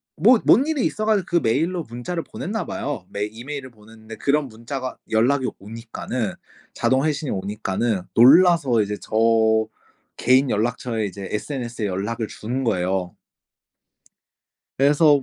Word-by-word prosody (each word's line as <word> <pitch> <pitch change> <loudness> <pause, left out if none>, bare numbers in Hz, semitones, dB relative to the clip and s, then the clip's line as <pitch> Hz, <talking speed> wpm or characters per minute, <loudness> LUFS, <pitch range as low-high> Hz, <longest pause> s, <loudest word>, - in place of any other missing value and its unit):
뭐 225 +9 +5
뭔 270 +5 +5
일이 310 -5 0
있어 215 - -2
가지고 210 -4 +2
그 175 - -3
메일로 165 +7 0
문자를 120 +9 -5
보냈나 215 +4 -4
봐요. 145 0 -4
메 100 +1 -2
이메일을 130 +5 -7
보냈는데 110 0 -13
그런 145 +4 +1
문자가 130 +3 -6
연락이 130 +4 +2
오니까는 115 0 -5 0.4
자동 130 +3 +2
회신이 150 -2 -1
오니까는 100 +1 -2
놀라서 140 - +6
이제 105 +1 -3
저 - - -14 1.0
개인 130 +2 +3
연락처에 115 +1 -1
이제 100 0 -6
SNS에 120 -1 -3
연락을 105 +4 -3
주는 125 +6 -4
거예요. 95 -5 -1 1.6
그래서 145 +1 +5
120 Hz, 315 characters per minute, -22 LUFS, 110-145 Hz, 1.6 s, 놀라서